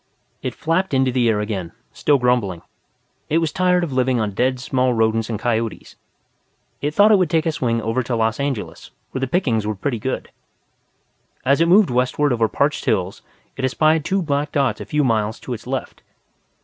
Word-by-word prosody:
It - - -4
flapped 165 0 0
into 130 -1 +2
the 120 -2 +2
air 105 -2 +1
again, 95 -5 -4 0.2
still 145 -2 +2
grumbling. 120 -9 0 0.7
It 155 - +2
was 165 -2 0
tired 180 -1 +2
of 155 -6 -3
living 130 -1 +1
on 105 -2 -1
dead 125 +5 0
small 125 -1 0
rodents 110 0 +1
and 110 - -2
coyotes. 115 0 -2 0.9
It 150 +1 -2
thought 205 +2 +6
it 205 - +6
would 180 -4 +1
take 160 0 +1
a 165 - +1
swing 115 -6 -1
over 115 +3 0
to 120 0 -2
Los 115 +1 0
Angeles, 140 -6 -4 0.2
where 130 - -3
the 135 - -1
pickings 120 - 0
were 110 - -2
pretty 120 +4 -2
good. 130 +4 -4 1.1
As 140 +4 +3
it 165 - +4
moved 190 -4 +5
westward 125 +3 +1
over 115 -2 +2
parched 140 +7 0
hills, 95 -2 -1 0.3
it 135 - -6
espied 155 +4 +2
two 190 +4 0
black 145 -1 -1
dots 135 -7 0
a - - -6
few 150 0 0
miles 110 -3 0
to 125 - -5
its 115 +1 -8
left. 135 0 -4
130 Hz, 195 wpm, -21 LUFS, 115-150 Hz, 1.1 s, thought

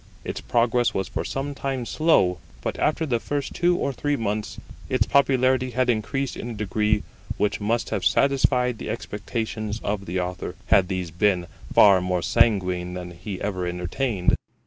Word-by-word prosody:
Its - - -5
progress 120 -1 +1
was 95 - -1
for - - -3
some 140 +1 -3
time 135 -3 -3
slow; 105 - +2 0.2
but - - -3
after 160 +1 +1
the 120 -6 0
first 140 +3 -3
two 175 0 +2
or 140 - -1
three 145 +3 -1
months 105 -3 -3 0.3
its - - +2
popularity 130 -2 +3
had 125 0 +2
increased 125 +4 -2
in 120 - -6
a - - -4
degree 105 +1 0 0.3
which 105 0 0
must 115 +3 0
have - - -1
satisfied 125 -4 +2
the - - -5
expectations 110 0 -4
of 100 -1 -2
the 90 +2 -1
Author, 90 0 -4 0.2
had 95 -2 +5
these 90 -3 -3
been 90 0 +2 0.3
far 100 -3 +7
more 90 -1 -1
sanguine 90 -6 +2
than 90 -1 -6
he 95 +2 -7
ever 95 -3 -2
entertained. 90 +4 0
110 Hz, 170 wpm, -24 LUFS, 95-130 Hz, 0.3 s, far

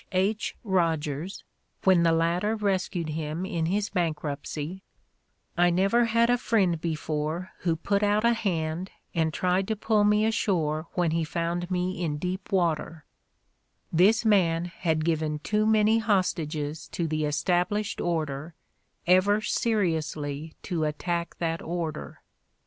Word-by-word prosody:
H. 200 +4 0
Rogers, 165 - -1 0.4
when 185 -3 +5
the 170 -1 +4
latter 170 +6 +1
rescued 185 -5 -1
him 155 +3 -3
in 165 -3 -1
his 200 +3 0
bankruptcy, 155 0 -3 0.7
"I 175 0 +4
never 195 +7 +3
had 230 +1 +3
a 245 0 +2
friend 190 -9 +1
before 160 +2 -2
who 170 -2 0
put 200 +5 0
out 210 +1 +2
a 235 - +5
hand 175 -4 -2 0.2
and 160 -2 +1
tried 185 +3 0
to 220 - 0
pull 210 0 +2
me 210 +1 +4
ashore 165 -8 0
when 175 -3 +1
he 165 0 +1
found 170 +2 -2
me 180 -1 -1
in 150 -3 -1
deep 185 +4 -4
water 165 -3 0 0.3
' - - -46
' - - -47
— - - -35
this 225 +5 +5
man 175 -6 +3
had 160 -3 -1
given 155 -2 0
too 210 +7 0
many 220 +1 +4
hostages 160 -7 -1
to 170 - -2
the 155 -1 -1
established 180 +7 0
order 155 -2 -2 0.5
ever 185 +4 +4
seriously 160 -9 -1
to 170 -5 -2
attack 170 +3 -2
that 165 -1 -2
order. 165 -2 -5
175 Hz, 145 wpm, -27 LUFS, 160-200 Hz, 0.7 s, when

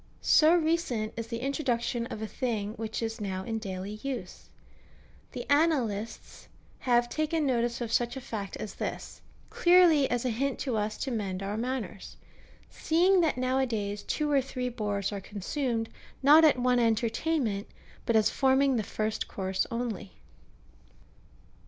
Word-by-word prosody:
So 315 +2 +6
recent 315 -10 0
is 230 0 -5
the 230 0 -4
introduction 245 -4 -1
of 220 - -6
a - - -3
thing 215 -4 -2
which 225 +1 -4
is 225 0 -4
now 190 -2 -3
in 225 +2 -3
daily 195 0 -6
use. 255 -9 -6 0.8
The 245 -1 -5
Annalists 265 -9 0 0.3
have 240 -1 +2
taken 310 +3 -1
notice 240 -2 0
of 230 -1 -3
such 240 +2 +1
a - - -6
fact 205 -5 -5
as 210 - -6
this, - - -6 0.3
clearly 345 -5 +5
as 245 0 -1
a 250 - +1
hint 270 +4 -1
to 255 -5 -1
us 215 0 -1
to 270 - -3
mend 195 -4 -3
our 200 +1 -3
manners; 230 -4 -4 0.5
seeing 360 +3 +3
that 315 -6 +1
now 255 +1 +1
a 265 - +2
days 205 -3 -3
two 300 +7 -1
or 280 -1 +4
three 255 -1 -4
boars 205 -4 -2
are 200 -1 -4
consumed, 225 +4 -2 0.4
not 300 +4 +8
at 305 -4 +6
one 250 0 +2
entertainment, 230 0 0 0.4
but 230 - +2
as 220 0 +4
forming 265 0 +3
the - - +1
first 215 +1 -3
course 190 -1 -2
only. 230 -4 -4
235 Hz, 160 wpm, -29 LUFS, 215-270 Hz, 0.8 s, not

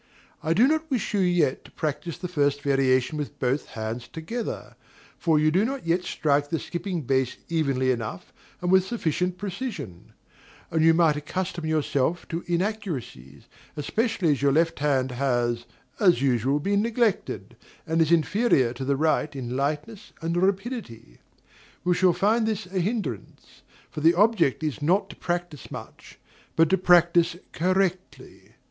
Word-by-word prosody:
I 160 +1 0
do 235 +8 +6
not 315 +2 0
wish 250 -7 -1
you 205 - +2
yet 175 -7 +2
to - - -15
practise 155 +2 -3
the 180 - -5
first 145 -4 0
variation 135 0 +2
with 145 - -5
both 130 +3 -1
hands 110 +2 -4
together, 220 +9 -5 0.4
for 160 -3 +2
you 155 +1 +3
do 185 +5 +3
not 265 0 -3
yet 170 +2 +1
strike 145 -1 +1
the 165 - 0
skipping 175 0 -4
bass 130 -1 0
evenly 135 -6 +1
enough 110 -7 -5 0.3
and 180 0 0
with 190 -1 +6
sufficient 180 -4 -1
precision; 185 - -6 0.6
and 160 -1 +2
you 165 0 +6
might 160 -3 +3
accustom 170 +2 -4
yourself 155 +1 0
to 165 +1 -3
inaccuracies, 170 - -3 0.3
especially 210 - 0
as 140 - 0
your 140 0 +4
left 165 +3 +2
hand 135 -3 +1
has, 120 -2 0 0.3
as 180 - +5
usual, 135 +1 +1
been 200 +6 +1
neglected, 230 -2 -1 0.3
and 165 +1 +1
is 160 0 +2
inferior 170 - +3
to 125 - -6
the 140 +1 +1
right 155 0 +1
in 125 -2 -4
lightness 150 - -3
and 165 +1 -2
rapidity. 190 - -2 0.6
We 180 - +3
shall 180 0 +3
find 220 +5 +2
this 220 -3 -2
a 185 +1 -3
hindrance; 190 - -4 0.3
for 150 - -6
the 165 +3 +5
object 190 - +3
is 155 -1 -2
not 180 +7 +1
to - - -12
practise 175 -5 -4
much, - - -10 0.4
but 165 -1 +4
to 190 - +5
practise 175 -1 +4 0.2
correctly. 185 +1 -2
165 Hz, 155 wpm, -25 LUFS, 140-190 Hz, 0.6 s, do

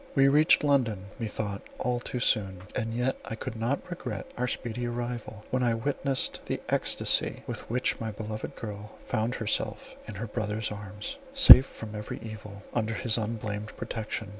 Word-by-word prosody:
We 135 -1 +6
reached 150 +2 +5
London, 120 -9 +2
methought, 105 -3 -3 0.2
all 125 -1 0
too 125 +1 -4
soon; 95 -6 +1
and 115 0 -1
yet 125 +2 0
I 110 - -5
could 120 +2 -6
not 115 +5 -1
regret 125 - -5
our 125 +1 -1
speedy 120 0 -3
arrival, 120 -3 -5
when 130 - +1
I 120 -2 +2
witnessed 135 +2 -1
the - - -1
extasy - - +2
with - - -6
which 125 +2 0
my 115 - -3
beloved 110 0 -6
girl 105 -1 -8
found 120 0 -1
herself 110 - -2
in 110 - -7
her 105 +4 -4
brother's 105 -1 -2
arms, 105 - -6 0.2
safe 200 - +11
from 110 -1 -9
every 105 0 -5
evil, 105 -2 -9
under 115 -1 0
his 115 -2 +2
unblamed 105 -1 -3
protection. 110 -1 -4
115 Hz, 165 wpm, -28 LUFS, 105-125 Hz, 0.2 s, safe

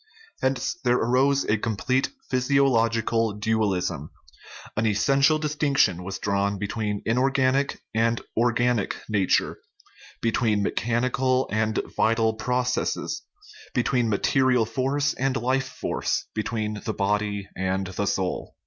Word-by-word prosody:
Hence 130 +3 0
there 125 -1 +3
arose 135 +4 +2
a 105 0 +1
com 110 -1 -2
plete 130 +4 +1 0.2
physiological 115 -4 +2
dualism 100 -8 -1 0.7
an 110 +1 +1
essential 135 +8 +3
distinction 145 - +1
was 95 +1 -5
drawn 100 0 0
between 105 0 -3
inorganic 130 +3 +1
and 115 +1 +2 0.2
organic 120 -2 +1
nature, 100 - +1 0.6
be 115 - 0
tween 110 -3 +1
mechanical 125 +4 0
and 110 +1 0 0.2
vital 115 0 +2
processes, 125 +3 -1 0.5
between 125 -1 +1
material 125 +3 +2
force 140 +4 0
and 135 0 -1
life 130 +2 0
force, - - -2
between 110 -1 -3
the 110 - -3
body 100 0 -1
and 95 +1 -1
the 95 +2 -3
soul. 95 -1 -2
115 Hz, 115 wpm, -25 LUFS, 105-130 Hz, 0.7 s, there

